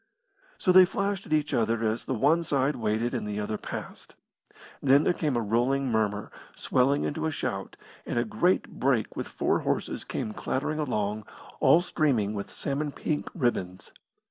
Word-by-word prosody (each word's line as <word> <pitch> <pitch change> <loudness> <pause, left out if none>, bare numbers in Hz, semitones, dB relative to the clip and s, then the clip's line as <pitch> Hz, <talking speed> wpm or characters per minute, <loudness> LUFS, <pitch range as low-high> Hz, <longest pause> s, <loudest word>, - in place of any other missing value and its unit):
So 185 - +2
they 185 +1 +9
flashed 195 +2 -1
at - - -13
each 150 -1 +1
other 115 0 +1
as 110 +2 -1
the 130 - -1
one 145 +8 +3
side 140 -2 +1
waited 110 0 -1
and - - -2
the 105 0 -3
other 105 +1 -3
passed. - - -8 0.7
Then 140 +2 +5
there - - +3
came 150 -7 -1
a - - +1
rolling 120 +5 +1
murmur 105 -2 0 0.2
swelling 135 +3 +2
into 160 +2 -1
a - - -1
shout, 95 -9 -4 0.3
and - - -4
a 120 - +2
great 175 +12 +1
brake 130 -5 +1
with - - -4
four - - 0
horses - - -2
came 110 - -4
clattering 150 +7 -2
along, 105 -7 -1 0.3
all 170 - +6
streaming 125 - +1
with 100 -1 -5
salmon 145 +1 -2
pink 150 +1 -3
ribbons. 95 - -2
130 Hz, 170 wpm, -27 LUFS, 110-150 Hz, 0.7 s, they